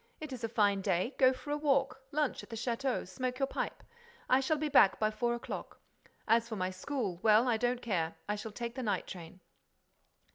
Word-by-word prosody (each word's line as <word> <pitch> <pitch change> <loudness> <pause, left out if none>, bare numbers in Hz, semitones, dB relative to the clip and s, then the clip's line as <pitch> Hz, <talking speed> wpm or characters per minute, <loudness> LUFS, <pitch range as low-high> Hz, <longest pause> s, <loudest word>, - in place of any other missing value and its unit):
It 310 -3 -6
is 245 - -7
a 230 - -1
fine 205 -3 +2
day. 190 +6 0
Go 260 -1 +7
for 275 +3 -7
a 295 - +1
walk, 275 -2 +1
lunch 295 -1 0
at - - -14
the 230 - -6
château, 240 0 -1
smoke 250 +6 -3
your 270 - +2
pipe. - - -4 0.4
I 255 - +5
shall 290 +4 +1
be 305 +1 -1
back 205 -9 +5
by 215 0 +2
four 235 +2 0
o'clock. 240 - -7 0.5
As 230 +1 +3
for 220 - -3
my 185 -2 -1
school, 195 -2 -3
well, 220 +2 +5
I 235 -2 +3
don't 245 +1 0
care: 170 -7 -1
I 210 - 0
shall 215 +1 -6
take 235 +2 -5
the 260 - -5
night 205 -6 -1
train." 175 0 -9
235 Hz, 215 wpm, -32 LUFS, 205-265 Hz, 0.5 s, Go